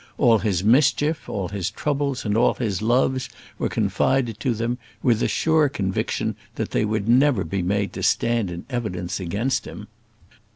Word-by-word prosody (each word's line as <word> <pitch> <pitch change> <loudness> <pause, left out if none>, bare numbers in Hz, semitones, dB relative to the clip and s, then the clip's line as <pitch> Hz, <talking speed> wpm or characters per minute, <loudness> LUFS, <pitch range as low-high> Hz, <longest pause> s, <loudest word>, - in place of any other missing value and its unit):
All 115 -5 +4
his 95 -5 0
mischief, 145 +6 +2
all 95 -4 -3
his 100 -1 -2
troubles, 140 +3 -2
and 105 -1 0
all 115 - +3
his 105 -6 -2
loves 130 +3 +1 0.3
were - - 0
confided 120 -5 0
to 125 -4 0
them, 120 +3 -2 0.2
with 120 -4 +3
the - - +1
sure 160 -2 +2
conviction 95 -9 -2 0.2
that - - -3
they - - +1
would 105 -1 -2
never 125 -3 +4
be 95 +4 -2
made 100 +2 -1
to - - -6
stand 115 -4 +1
in 85 0 -7
evidence 105 -10 -3
against 115 +9 -1
him. - - -8
115 Hz, 170 wpm, -23 LUFS, 100-130 Hz, 0.3 s, All